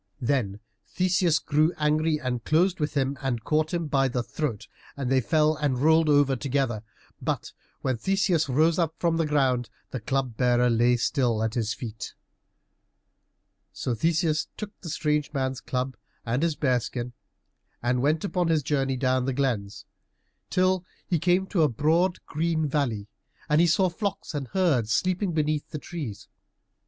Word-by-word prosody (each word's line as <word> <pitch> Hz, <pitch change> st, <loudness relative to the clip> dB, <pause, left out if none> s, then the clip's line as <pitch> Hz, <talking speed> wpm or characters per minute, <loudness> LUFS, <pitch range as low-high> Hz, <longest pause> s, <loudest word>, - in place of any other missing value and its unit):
Then 120 Hz, -6 st, 0 dB, 0.3 s
Theseus 180 Hz, -3 st, +2 dB
grew 155 Hz, +2 st, +2 dB
angry 155 Hz, +1 st, +1 dB
and 125 Hz, -4 st, -3 dB
closed 175 Hz, +4 st, +2 dB
with 150 Hz, 0 st, -2 dB
him, 135 Hz, -1 st, 0 dB
and 125 Hz, -5 st, -2 dB
caught 155 Hz, +3 st, +1 dB
him 170 Hz, -2 st, -1 dB
by 135 Hz, -2 st, +2 dB
the 125 Hz, -1 st, -2 dB
throat, 120 Hz, -6 st, -4 dB, 0.3 s
and 135 Hz, -2 st, -2 dB
they 130 Hz, -1 st, +4 dB
fell 155 Hz, +4 st, +2 dB
and 145 Hz, -4 st, 0 dB
rolled 160 Hz, +3 st, +4 dB
over 145 Hz, -2 st, +4 dB
together. 130 Hz, -4 st, -1 dB, 0.4 s
But -, -, -3 dB, 0.3 s
when 130 Hz, -2 st, 0 dB
Theseus 185 Hz, -, +1 dB
rose 160 Hz, +6 st, +3 dB
up 165 Hz, -2 st, 0 dB
from 170 Hz, -1 st, +1 dB
the 165 Hz, -2 st, +1 dB
ground 130 Hz, -5 st, +1 dB, 0.2 s
the 130 Hz, -, -3 dB
Club 130 Hz, +1 st, -2 dB
bearer 125 Hz, -1 st, +3 dB
lay 120 Hz, +1 st, +3 dB
still 120 Hz, -3 st, +1 dB
at 110 Hz, 0 st, -1 dB
his 115 Hz, -1 st, -1 dB
feet. 110 Hz, -3 st, -7 dB, 1.6 s
So 125 Hz, -, -2 dB
Theseus 160 Hz, -, +1 dB
took 210 Hz, -1 st, -5 dB
the 170 Hz, -, -7 dB
strange 150 Hz, -1 st, 0 dB
man's 130 Hz, -2 st, -2 dB
club 130 Hz, 0 st, -2 dB, 0.3 s
and 120 Hz, +3 st, 0 dB
his 165 Hz, -2 st, +1 dB
bear 130 Hz, -5 st, +2 dB
skin 120 Hz, +1 st, -5 dB, 0.7 s
and 125 Hz, +1 st, +1 dB
went 155 Hz, +3 st, +1 dB
upon 180 Hz, -3 st, 0 dB
his 160 Hz, -3 st, +2 dB
journey 135 Hz, -2 st, 0 dB
down 130 Hz, 0 st, +1 dB
the 135 Hz, -, -1 dB
glens, 120 Hz, -7 st, -2 dB, 0.6 s
till 185 Hz, 0 st, +2 dB, 0.2 s
he 170 Hz, -, 0 dB
came 180 Hz, +3 st, +2 dB
to 185 Hz, -2 st, 0 dB
a 155 Hz, -, +4 dB
broad 160 Hz, -, +2 dB
green 160 Hz, +1 st, 0 dB
valley, 130 Hz, -8 st, -1 dB, 0.4 s
and 150 Hz, +1 st, +4 dB
he 175 Hz, -, +5 dB
saw 185 Hz, +3 st, +3 dB
flocks 195 Hz, +1 st, -4 dB
and 140 Hz, -3 st, -3 dB
herds 135 Hz, -, +1 dB
sleeping 185 Hz, -, +1 dB
beneath 155 Hz, -2 st, -1 dB
the -, -, -5 dB
trees. 145 Hz, -, -7 dB
145 Hz, 165 wpm, -26 LUFS, 125-165 Hz, 1.6 s, he